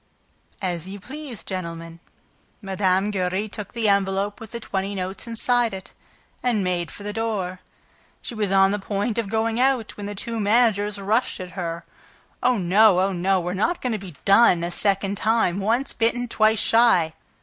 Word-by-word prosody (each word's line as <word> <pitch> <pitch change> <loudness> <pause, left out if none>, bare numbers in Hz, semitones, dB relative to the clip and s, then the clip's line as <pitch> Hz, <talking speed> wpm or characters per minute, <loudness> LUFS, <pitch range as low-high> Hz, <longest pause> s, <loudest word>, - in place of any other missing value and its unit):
"As 175 -2 -2
you 200 +1 -7
please, 260 - -7
gentlemen." 165 -2 -6 0.6
Mme. 195 0 0
Giry 190 +1 -1
took 210 -1 -8
the 230 -2 0
envelope 200 0 +1
with 225 - -9
the 235 - -6
twenty 195 -2 -3
notes 190 +4 -5
inside 230 -1 +1
it 190 0 -10 0.5
and 235 -5 +1
made 175 -2 -1
for 205 - -10
the 210 0 -4
door. 205 -5 -2 0.6
She - - -7
was 210 -4 -1
on 195 0 +5
the 205 - -1
point 205 +3 -2
of 215 -4 -3
going 225 +1 0
out 255 -3 +1
when 205 -1 -5
the 205 - -5
two 230 +3 -4
managers 210 -1 +2
rushed 215 +5 0
at 180 -1 -7
her: 170 -2 -5 0.6
"Oh, 250 -1 +3
no! 195 +1 +5
Oh, 190 +1 +2
no! 185 +2 +1
We're 175 0 -3
not 220 - 0
going 250 -2 -2
to 215 - -2
be 185 -5 -10
'done' 195 -4 +5
a 175 - -2
second 195 +1 0
time! 215 -4 +1
Once 230 +7 0
bitten, 245 +2 0
twice 220 -1 +3
shy!" 220 -8 +4
200 Hz, 180 wpm, -23 LUFS, 185-225 Hz, 0.6 s, on